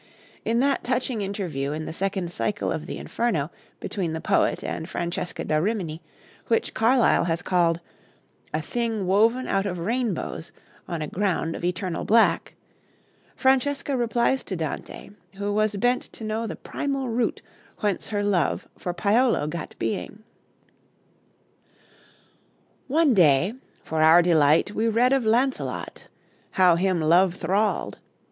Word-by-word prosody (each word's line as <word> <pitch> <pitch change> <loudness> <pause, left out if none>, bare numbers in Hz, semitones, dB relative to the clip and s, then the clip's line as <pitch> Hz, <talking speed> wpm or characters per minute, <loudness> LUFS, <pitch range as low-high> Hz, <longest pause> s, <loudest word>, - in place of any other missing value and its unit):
In 230 +1 +1
that 275 0 +1
touching 250 -2 -1
interview 180 -9 -3
in 155 +1 -4
the 160 - -5
second 190 -1 -2
cycle 205 +3 -2
of 155 - -4
the - - -5
Inferno 175 -11 -1 0.3
between 175 -6 -3
the 160 - -3
poet - - +1
and 160 +2 -4
Francesca 175 +1 -3
da 155 - +1
Rimini, 175 -3 -2 0.5
which 230 - +1
Carlyle 235 -2 +3
has 170 0 -1
called 170 -2 +2 0.7
"a 155 0 -2
thing 225 -3 -2
woven 225 +7 +3
out 195 +1 0
of 180 -2 -3
rainbows 205 -3 -2 0.4
on 165 -3 -3
a - - -4
ground 180 -4 -1
of - - -8
eternal 180 0 -2
black," 225 +1 +3 0.8
Francesca 275 +1 +1
replies 240 +2 +1
to 190 - -4
Dante, 160 +4 -5 0.2
who 205 +1 -2
was 215 0 +1
bent 245 +5 +2
to - - -9
know 220 +1 -2
the - - -5
primal 275 -2 -3
root 235 0 -1 0.4
whence 205 -3 -1
her 205 -2 -1
love 190 -7 0
for 175 -1 -4
Paolo 225 - +2
gat 165 +3 -5
being: 210 +1 -4 2.6
"One 300 0 +3
day 175 0 +4 0.3
For 160 0 -2
our 160 +2 +7
delight, 160 +1 +4
we 220 +2 0
read 240 +4 +3
of 270 -4 +1
Launcelot, 255 +4 -1 0.5
How 180 -2 +5
him 180 -1 +1
love 175 +3 +4
thralled. 195 +5 -1
200 Hz, 140 wpm, -25 LUFS, 170-230 Hz, 2.6 s, our